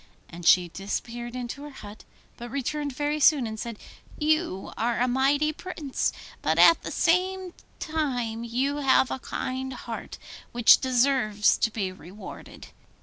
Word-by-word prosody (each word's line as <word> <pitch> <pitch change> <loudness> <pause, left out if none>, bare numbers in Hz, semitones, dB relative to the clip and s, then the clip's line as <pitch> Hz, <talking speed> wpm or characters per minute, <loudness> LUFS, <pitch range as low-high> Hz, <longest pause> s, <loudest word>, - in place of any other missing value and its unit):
And 170 0 -5
she 180 -1 +6
disappeared 235 +6 -5
into 250 +2 -5
her 295 - -8
hut, 215 -6 -11 0.3
but 240 0 -8
returned 285 +3 -2
very 295 +3 -2
soon 290 -3 +5
and 220 -1 -5
said, 230 -1 -5 0.4
'You 310 - 0
are 235 +1 0
a 250 - +2
mighty 280 +4 +2
Prince, 310 -5 -3 0.3
but - - +1
at 335 - +7
the - - -6
same 365 +1 +1 0.2
time 245 -8 -2
you 260 +5 -1
have 265 -2 +3
a - - -3
kind 260 +1 -4
heart, - - -7 0.4
which 240 -1 +7
deserves 250 -5 +2
to 225 - +2
be 205 -4 -3
rewarded. 185 +3 -11
255 Hz, 145 wpm, -26 LUFS, 225-295 Hz, 0.4 s, at